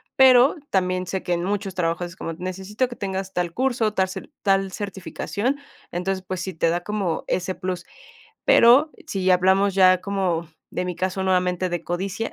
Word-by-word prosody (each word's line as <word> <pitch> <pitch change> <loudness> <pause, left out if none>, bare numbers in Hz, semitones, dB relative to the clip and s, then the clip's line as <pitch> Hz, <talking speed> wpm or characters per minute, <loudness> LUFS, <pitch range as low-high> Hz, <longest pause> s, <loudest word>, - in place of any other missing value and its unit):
Pero 260 +1 +7
también 185 -1 0
sé 190 0 -3
que 180 - -1
en 170 0 -1
muchos 200 0 -2
trabajos 170 0 -1
es 170 - -12
como 165 -3 -5
necesito 190 +7 -3
que 240 - -9
tengas 190 -1 -4
tal 175 -1 -1
curso, 240 -5 +1
tar 190 0 +2 0.4
tal 195 -1 +2
certificación. 205 +6 -3 0.3
Entonces, 185 +2 -2
pues, 185 -1 -3
sí 190 +2 -4
te 165 +1 +1
da 175 +1 0
como 195 -5 -2
ese 185 0 -1
plus. 180 -1 -4 0.6
Pero, 260 +7 +6 0.2
si 190 -5 +1
hablamos 190 +2 +3
ya 185 -1 +5
como 185 -5 -1 0.3
de 180 - -1
mi 180 -2 -3
caso 185 +1 -2
nuevamente 185 -1 +1
de 175 -2 -3
codicia, 190 +5 -3
190 Hz, 175 wpm, -23 LUFS, 180-200 Hz, 0.6 s, Pero